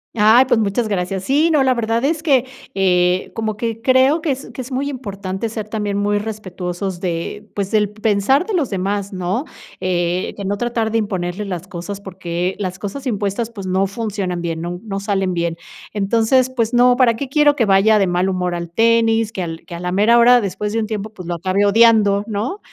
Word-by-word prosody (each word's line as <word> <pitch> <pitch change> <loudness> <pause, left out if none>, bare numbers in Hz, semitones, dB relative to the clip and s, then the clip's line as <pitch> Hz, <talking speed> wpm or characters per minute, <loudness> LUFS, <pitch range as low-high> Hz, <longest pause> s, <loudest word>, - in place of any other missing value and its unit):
Ay, 225 +4 +6
pues 245 -3 +2
muchas 215 +2 0
gracias. 190 -1 -2
Sí, 295 +8 +2
no, 300 -4 +3
la 260 -1 +3
verdad 230 +1 0
es 310 +2 0
que, 275 -6 +3 0.3
eh, 180 -1 +2
como 220 -2 -3
que 230 0 -3
creo 260 +5 +4
que 325 - -2
es 270 -3 -3
que 255 - -5
es 255 - -9
muy 270 +2 -1
importante 200 -5 -4
ser 215 -1 -5
también 210 -2 -2
muy 205 0 +1
respetuosos 190 -3 -5
de 180 +4 -4
pues 200 -1 -2
del 210 -2 +2
pensar 215 - +1
de 440 - -4
los 315 -9 0
demás, 200 +1 -2
¿no? 190 - -2 0.4
Eh, 175 0 -1
de 200 - -5
no 200 +1 0
tratar 230 -1 -1
de 225 - +2
imponerles 190 -1 -3
las 180 -2 -5
cosas, 190 +3 -6
porque 180 -1 -4
las 185 -2 -3
cosas 215 +8 -6
impuestas, 215 0 -2
pues, 200 -5 -8
no 190 +1 +1
funcionan 200 -4 -3
bien, 165 -1 -3
nun 175 +1 -5
no 195 -1 -3
salen 195 -2 -1
bien. 170 -1 -2 0.4
Entonces, 230 +5 +2
pues 230 0 0
no, 245 +1 +5
para 245 -2 +3
qué 275 +4 -4
quiero 290 +2 +3
que 245 -6 +2
vaya 200 +2 +4
de 200 - +3
mal 180 +1 0
humor 180 -1 -1
al 170 -1 -4
tenis, 225 +2 +2
que 195 - -5
al 165 -2 -6
que 180 - -10
a 170 - -6
la 180 0 -3
mera 215 +5 +4
hora, 245 +1 +6
después 205 +1 -3
de 225 - 0
un 220 - -1
tiempo, 215 -1 -4
pues, 185 -5 -10
lo 175 - -2
acabe 185 +4 0
odiando, 205 -1 +4
¿no? 225 - -3
205 Hz, 215 wpm, -19 LUFS, 185-230 Hz, 0.4 s, Ay